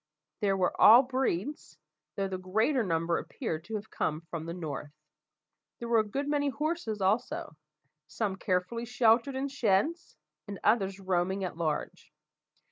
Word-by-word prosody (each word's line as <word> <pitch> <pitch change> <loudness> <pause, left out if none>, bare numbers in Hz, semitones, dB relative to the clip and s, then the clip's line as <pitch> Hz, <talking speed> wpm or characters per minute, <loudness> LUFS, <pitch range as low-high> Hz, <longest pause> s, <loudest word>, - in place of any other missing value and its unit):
They 205 -2 +1
were 185 -2 +1
of - - -14
all 240 +4 +9
breeds, 255 - -2 0.4
though 195 -1 -1
the 190 -1 -4
greater 220 +9 +1
number 165 -2 0
appeared 160 +1 -5
to 220 - -5
have 210 +1 -6
come 155 +1 -2
from 165 -1 -5
the 170 - -4
north. 150 -4 -5 0.9
There 235 - -6
were 235 -1 +4
a - - +3
good 270 +7 -3
many 290 -1 +1
horses 295 - -2
also 200 -2 0 0.5
some 190 +5 -2
carefully 190 +5 -1
sheltered 240 +2 +3
in 270 +1 -1
sheds, 275 - 0 0.3
and 200 -1 -6
others 195 -4 +2
roaming 190 +1 0
at 180 - -4
large. 160 -3 -3
200 Hz, 155 wpm, -30 LUFS, 180-245 Hz, 0.9 s, all